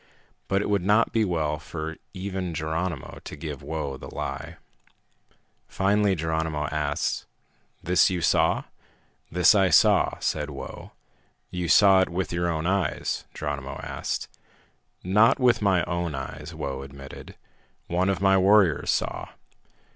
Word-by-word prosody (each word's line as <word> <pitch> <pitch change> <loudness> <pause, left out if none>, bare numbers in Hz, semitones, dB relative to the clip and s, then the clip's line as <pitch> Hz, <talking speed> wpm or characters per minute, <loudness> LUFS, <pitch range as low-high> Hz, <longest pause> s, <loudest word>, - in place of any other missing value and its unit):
But 100 +1 +1
it - - -3
would 100 -2 +2
not 105 +5 +3
be 115 - +3
well 80 -6 -1
for 80 -1 -6 0.2
even 95 -3 -4
Geronimo 80 0 -3
to - - -8
give - - -6
Whoa 70 -4 -4
the - - -10
lie. - - -5 1.1
Finally 100 +2 +2
Geronimo 80 -2 -1
asked, 75 -1 -1 0.6
"This 90 +2 +4
you 90 -1 -1
saw?" - - +2 0.7
"This 90 +4 +5
I 95 -3 +4
saw," - - +4
said 75 -1 -1
Whoa. 70 - -9 0.6
"You 90 -1 -3
saw 95 +1 +6
it 95 - +1
with 90 0 -3
your 85 0 0
own 80 -1 -2
eyes?" 95 +1 -1
Geronimo 70 -2 -4
asked. - - -4 0.8
"Not 105 +7 +4
with 125 -3 +3
my 95 -4 +3
own 85 -3 -2
eyes," 75 +3 -6
Whoa 70 -4 -4
admitted. 70 0 -10 0.5
"One 90 +3 0
of 95 - -1
my 95 -1 +5
warriors 95 -4 +4
saw." - - -1
85 Hz, 140 wpm, -26 LUFS, 80-95 Hz, 1.1 s, saw